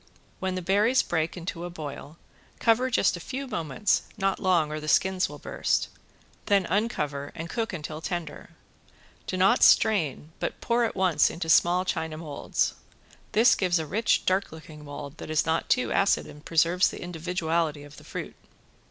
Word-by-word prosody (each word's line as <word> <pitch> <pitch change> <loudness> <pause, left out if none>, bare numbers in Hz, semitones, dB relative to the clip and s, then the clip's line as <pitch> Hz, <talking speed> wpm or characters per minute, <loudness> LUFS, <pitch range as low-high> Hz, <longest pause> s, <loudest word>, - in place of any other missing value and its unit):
When 190 -1 -2
the 185 - -4
berries 210 +8 +3
break 160 +1 -1
into 170 0 -5
a 175 - -4
boil, 155 -2 -8 0.4
cover 235 +3 +2
just 215 -6 +2
a - - -7
few 265 +10 -5
moments, 185 - 0 0.2
not 195 -1 0
long, 175 -6 +2
or 155 - -3
the 155 - -8
skins 190 +3 +2
will - - -9
burst, - - -1 0.6
then 200 -3 +3
uncover 150 -10 -1
and 165 - -5
cook 230 -1 -2
until 155 -3 -6
tender. 170 -4 -5 0.8
Do 185 - -2
not 195 +7 +4
strain, 165 - +3
but - - -3
pour 235 0 +1
at - - -3
once 185 -4 +3
into 165 -1 -5
small 175 +2 +4
china 160 -3 -2
molds. 150 -3 -2 0.6
This 225 +3 +6
gives 180 -2 +1
a 160 - -1
dark 150 - -11
rich 225 +4 +2 0.3
looking 155 -1 -12
mold 145 +1 -8
that - - -8
is 155 -1 +1
not 160 +1 -1
too 250 - +2
acid 200 - +2
and 150 +1 -13
preserves 170 +2 +3
the - - -6
individuality 165 -3 -2
of 145 +1 -13
the - - -13
fruit. - - -7
175 Hz, 175 wpm, -27 LUFS, 155-195 Hz, 0.8 s, This